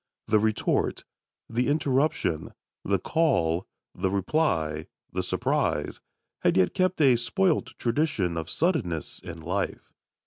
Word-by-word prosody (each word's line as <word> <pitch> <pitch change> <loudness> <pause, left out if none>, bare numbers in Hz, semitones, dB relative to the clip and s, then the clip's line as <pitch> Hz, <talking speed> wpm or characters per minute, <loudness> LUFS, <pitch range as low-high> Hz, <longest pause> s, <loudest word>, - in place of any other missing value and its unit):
The 110 - +3
retort, 110 0 0 0.4
the 120 +2 0
interruption, 140 - 0 0.3
the 100 0 +2
call, 95 - +1 0.3
the 95 +1 -1
reply, 90 - 0 0.3
the - - 0
surprise, - - -1 0.4
had - - +2
yet 95 -1 +3
kept 185 -1 +1
a 135 -4 +6
spoilt 180 +7 0
tradition 115 - 0
of 80 -1 -4
suddenness 125 - -1
and 85 -3 -8
life. 95 +4 -3
110 Hz, 115 wpm, -27 LUFS, -, 0.4 s, a